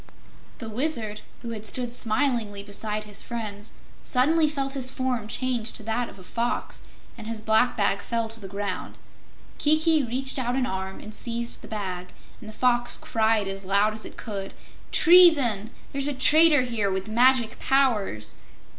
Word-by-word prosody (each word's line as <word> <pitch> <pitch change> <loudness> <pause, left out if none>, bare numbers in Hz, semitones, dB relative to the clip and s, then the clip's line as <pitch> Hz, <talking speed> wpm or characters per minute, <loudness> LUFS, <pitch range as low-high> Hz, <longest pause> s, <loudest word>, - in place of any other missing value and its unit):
The 225 - -7
Wizard, 220 -3 -1 0.2
who 235 - -5
had 215 -2 -6
stood 240 +2 0
smilingly 225 -4 0
beside 210 +1 -4
his 210 -1 -4
friends, 215 -3 -6 0.3
suddenly 305 +5 +3
felt 275 -2 -2
his 260 -2 +1
form 255 -5 -2
change 240 -1 -1
to - - -9
that 225 +2 -2
of - - -14
a 185 - -13
fox, 235 +5 -3 0.4
and 220 - -8
his 225 -1 -4
black 220 +3 +2
bag 200 -1 +1
fell 230 -1 -2
to 225 0 -2
the 195 - -8
ground. 200 -1 -5 0.6
Kiki 315 +1 +3
reached 265 +3 -1
out 245 -1 -1
an 260 -1 +1
arm 190 -3 -4
and 215 - -10
seized 235 0 -3
the - - -11
bag, 185 -4 -5 0.3
and 220 - -10
the - - -10
Fox 240 0 +2
cried 220 -2 +1
as 195 0 -4
loud 200 +3 +2
as 215 - -7
it - - -10
could: 200 -4 -6 0.4
"Treason! 290 - +6 0.2
There's 275 0 -1
a 290 - 0
traitor 300 +1 +5
here 230 -5 -1
with 190 +1 -3
magic 235 +1 +3
powers!" 220 - +1
230 Hz, 170 wpm, -25 LUFS, 210-255 Hz, 0.6 s, Treason